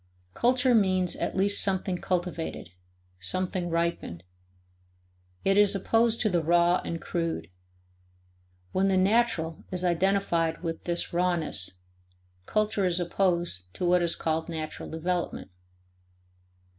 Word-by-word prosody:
Culture 250 - +2
means 185 -5 +2
at - - -3
least 200 +1 +6
something 190 -2 0
cultivated, 175 - -3 0.5
something 180 - -1
ripened; 170 - -2 1.2
it 195 +1 +3
is 205 0 +4
opposed 225 +3 +2
to 220 - +2
the 175 -3 +1
raw 175 +2 +3
and 165 - -4
crude. 165 - -3 1.2
When 190 +1 +1
the 190 -1 +2
"natural" 185 -5 +1
is 180 -1 -3
identified 175 -2 +1
with 165 -1 -4
this 170 0 -1
rawness, 170 - 0 0.7
culture 215 -2 0
is 180 -1 0
opposed 175 - -1
to 180 - -3
what 180 0 +3
is 170 -1 +2
called 160 +1 -2
natural 160 -2 -6
development. 170 - -3
175 Hz, 120 wpm, -27 LUFS, 165-195 Hz, 1.2 s, least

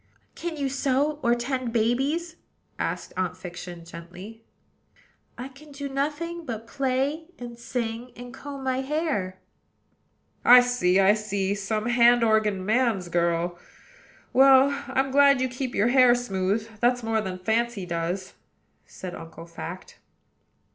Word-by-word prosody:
"Can 335 -2 -5
you 280 -1 -1
sew, 275 +2 0
or 235 0 +3
tend 250 0 -3
babies?" 270 +9 0 0.4
asked - - -3
Aunt 185 -1 -2
Fiction 175 -1 -9
gently. 180 +7 -11 0.9
"I 250 +2 -6
can 280 +3 -16
do 280 0 -6
nothing 300 +5 -3
but 230 -6 -6
play 275 +5 -1
and 240 -1 -8
sing, 235 0 -4
and 245 +1 -10
comb 275 0 -8
my 260 0 0
hair." 265 - -2 1.1
"I 245 +1 +9
see! 245 -7 +2
I 195 +1 +6
see! 200 -2 -1
some 210 +2 -2
hand 240 0 +5
organ 215 -4 +2
man's 220 -5 +1
girl. 170 0 0 0.7
Well, 270 +1 +6 0.2
I'm 265 0 0
glad 280 -1 +5
you 260 - +1
keep 255 0 -5
your 215 +4 +3
hair 250 -1 +6
smooth, 210 -2 -1
that's 245 +1 +2
more 225 -1 0
than 190 -3 -5
Fancy 220 +1 -1
does," 175 +2 -3 0.5
said 185 -2 -8
Uncle 165 0 -10
Fact. 170 +2 -9
235 Hz, 135 wpm, -25 LUFS, 195-265 Hz, 1.1 s, I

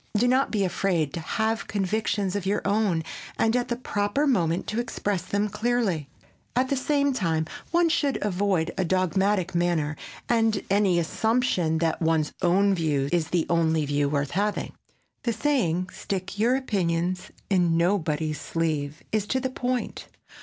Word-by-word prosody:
Do 240 +4 +3
not 260 +2 +3
be 210 -3 0
afraid 175 -5 0
to - - -3
have 220 +7 -1
convictions 205 -1 -1
of 195 -2 -2
your 205 - 0
own 200 -5 +1 0.3
and 225 +1 +2
at 245 -1 +1
the 240 - -1
proper 205 +3 -1
moment 175 - +1
to 215 - -2
express 205 -5 -2
them 205 +4 -1
clearly. 210 - 0 0.5
At 255 +1 +2
the 275 - +2
same 280 +1 +1
time, 165 -8 0 0.2
one 345 0 +3
should 295 -4 +1
avoid 190 -4 0
a - - +3
dogmatic 190 +1 +1
manner 170 -4 +1 0.3
and 225 -3 +2
any 200 -3 +3
assumption 180 -2 +1
that 165 +1 0
one's 160 -2 +1
own 195 +3 +3
view 150 -6 0
is 170 -3 +1
the 170 0 0
only 160 -2 +2
view 145 0 +1
worth 140 -1 -1
having. 205 +3 -1 0.5
The 235 -4 0
saying 210 - 0
"Stick 195 +1 -4
your 240 +4 +3
opinions 180 -7 -1 0.2
in 175 -3 +3
nobody's 160 -4 0
sleeve" 155 -3 -2
is 215 -2 0
to 260 - +1
the 260 0 -2
point. 250 -1 -3
190 Hz, 160 wpm, -26 LUFS, 165-225 Hz, 0.5 s, Do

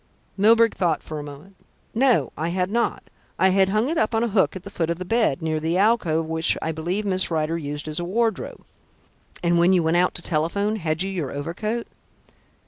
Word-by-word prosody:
Milburgh 225 +3 +4
thought 170 -4 0
for 155 -1 -6
a - - -6
moment. 150 +7 -12 0.4
"No, 250 +1 +2
I 160 +2 -2
had 180 +2 -1
not. 235 +1 0 0.3
I 190 - +4
had 190 0 +3
hung 215 +5 +1
it 320 +2 0
up 220 +1 +1
on 225 - +2
a 235 - 0
hook 195 -2 +2
at 185 - -7
the 200 - -9
foot 165 -4 -2
of 170 - -1
the 185 - -6
bed, 220 - +1
near 155 -1 0
the 165 +3 -1
alcove 190 -7 +2
which 160 0 0
I 160 - -2
believe 175 +6 -3
Miss 190 -2 +1
Rider 160 -1 -1
used 150 -2 -5
as 155 +1 -3
a - - -3
wardrobe." 220 +4 -2 0.8
"And 170 0 +3
when 175 +2 +4
you 180 -2 +3
went 160 +2 +2
out 180 +1 +2
to 175 - -6
telephone, 200 +7 0
had 160 -2 0
you 195 - -3
your 165 -8 -3
overcoat?" 195 - -3
180 Hz, 220 wpm, -23 LUFS, 160-210 Hz, 0.8 s, Milburgh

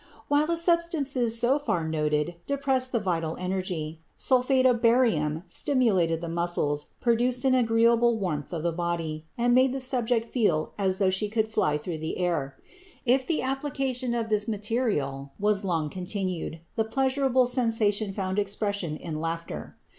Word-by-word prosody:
While 290 +1 +3
the 335 0 0
substances 315 -9 +1
so 250 +5 +2
far 205 - -1
noted 150 +1 -1
depressed 270 -2 0
the 235 - +1
vital 165 -5 -2
energy, 180 -4 -3 0.2
sulphate 260 0 +3
of 245 -3 +4
barium 205 -11 +2
stimulated 185 - +1
the 170 - -4
muscles, 165 -3 -1
produced 245 +2 +1
an 260 - +4
agreeable 235 -1 +3
warmth 160 -8 -3
of 165 -3 -4
the 170 - +1
body, 165 -2 -3
and 240 0 +2
made 255 +1 +4
the 270 - -2
subject 245 -3 +1
feel 175 -11 +1
as 190 -1 +1
though 190 -1 +2
she 205 +3 -1
could 220 0 0
fly 210 -9 +1
through 160 +1 -5
the 160 +1 -4
air. 170 -7 -1 0.5
If 255 +2 +2
the 325 -6 0
application 265 -2 -2
of 230 -1 -2
this 210 0 +1
material 205 - -1
was 210 0 +1
long 165 -5 0
continued, 185 -3 -3
the 220 - +2
pleasurable 260 +2 +2
sensation 225 -4 +1
found 190 0 -2
expression 200 -5 -2
in 155 -2 -5
laughter. 165 0 -5
210 Hz, 155 wpm, -27 LUFS, 170-250 Hz, 0.5 s, of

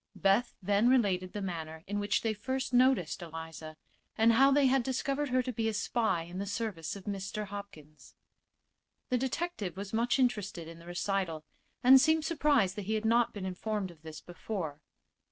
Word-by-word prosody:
Beth 200 +5 +2
then 205 +5 +3
related 190 -8 +2
the 205 - -5
manner 160 -3 -5
in 205 +1 -2
which 205 0 0
they 225 -1 +1
first 260 +5 -3
noticed 245 -10 +3
Eliza, 160 -1 -8 0.4
and 225 +1 +5
how 270 +4 +6
they 280 0 +4
had 265 0 +4
discovered 275 +3 -1
her 255 0 +2
to 255 0 -4
be 225 0 0
a 220 - -3
spy 215 -6 0
in 175 +2 -7
the 200 - -3
service 200 -6 -3
of 200 - -9
Mr. 200 +1 -4
Hopkins. 160 -8 -11 0.9
The 250 - +1
detective 265 - -3
was 200 +1 -6
much 235 +3 +2
interested 205 -10 0
in 165 0 -10
the 170 - -14
recital 175 -3 -2 0.4
and 260 +1 +8
seemed 315 +2 +3
surprised 290 - +2
that 205 - -4
he 220 - 0
had 215 +1 -2
not 235 +1 +3
been 200 -3 -6
informed 190 +1 -3
of 160 -3 -19
this 160 -1 -9
before. 175 -4 -5
205 Hz, 185 wpm, -31 LUFS, 175-245 Hz, 0.9 s, and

